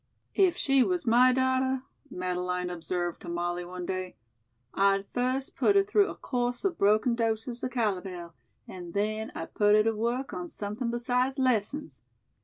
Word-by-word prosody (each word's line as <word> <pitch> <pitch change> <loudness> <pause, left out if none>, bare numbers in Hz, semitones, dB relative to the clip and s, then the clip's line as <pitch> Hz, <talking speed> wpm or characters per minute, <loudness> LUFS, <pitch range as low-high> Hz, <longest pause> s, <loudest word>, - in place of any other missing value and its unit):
"If 380 -3 +3
she 275 -1 +3
was 355 -2 -1
my 245 +2 +6
daughter," 260 0 +1 0.3
Madeleine 180 0 -2
observed 175 0 -3
to - - -8
Molly 175 +1 -2
one 180 0 -6
day, 185 0 -4 0.6
"I'd 195 0 +2
first 255 +2 -1
put 405 - +3
her 395 - +6
through 410 0 +3
a - - -6
course 245 +4 -2
of 355 -4 -1
broken 215 +4 +3
doses 230 +1 -2
of 255 - -1
calomel, 190 -8 -2 0.3
and 175 -1 -9
then 215 +2 -1
I'd 165 - -6
put 205 0 +4
her 215 - +5
to 225 +1 +1
work 240 +5 -2
on 180 -1 -4
something 210 +6 -4
besides 250 +3 0
lessons. 250 - 0
220 Hz, 165 wpm, -28 LUFS, 180-255 Hz, 0.6 s, my